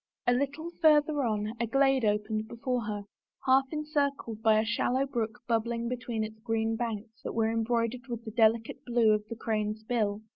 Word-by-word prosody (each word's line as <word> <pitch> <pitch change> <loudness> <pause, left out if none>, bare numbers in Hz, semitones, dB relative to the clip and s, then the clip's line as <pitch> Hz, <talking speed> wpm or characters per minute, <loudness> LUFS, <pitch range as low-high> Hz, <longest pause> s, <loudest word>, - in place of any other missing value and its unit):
A 245 - +4
little 290 +6 -2
farther 300 -2 +5
on 215 -3 -1
a 235 - 0
glade 270 +1 +3
opened 215 +1 0
before 240 0 -2
her, 210 -1 -3 0.4
half 265 +1 +5
encircled 285 -7 -2
by 220 -1 +5
a 220 - +1
shallow 245 +4 +1
brook 240 -2 -3
bubbling 235 0 0
between 240 -3 -3
its 215 0 -7
green 225 0 0
banks 225 -1 -4
that - - -5
were 225 -1 +2
embroidered 230 +2 -1
with 235 -2 -5
the 220 - -5
delicate 225 0 +2
blue 235 -3 +3
of 210 0 0
the 230 - -6
crane's 215 -1 -2
bill. 215 -3 -1
230 Hz, 180 wpm, -29 LUFS, 220-255 Hz, 0.4 s, farther